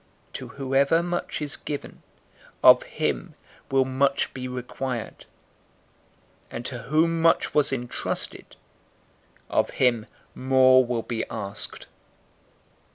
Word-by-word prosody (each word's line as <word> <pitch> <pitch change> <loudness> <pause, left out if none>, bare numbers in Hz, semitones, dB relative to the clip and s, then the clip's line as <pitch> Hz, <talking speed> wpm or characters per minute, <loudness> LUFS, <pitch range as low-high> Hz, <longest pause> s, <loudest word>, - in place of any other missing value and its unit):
To - - -6
whoever 140 +4 +1
much 175 -3 -3
is 145 - -2
given, 145 -1 -7 0.6
of - - +9
him - - -3 0.3
will 135 -1 +3
much 135 +1 +1
be 130 -1 -5
required; 125 -1 -5 1.2
and 120 - -7
to 125 - -4
whom 165 +5 +1
much 165 0 +3
was 145 -2 +3
entrusted, 125 -2 -4 0.9
of - - +1
him 120 -4 +2 0.3
more 130 0 +5
will 120 -2 -2
be 115 -2 -3
asked. 100 -3 -4
130 Hz, 105 wpm, -25 LUFS, 125-145 Hz, 1.2 s, of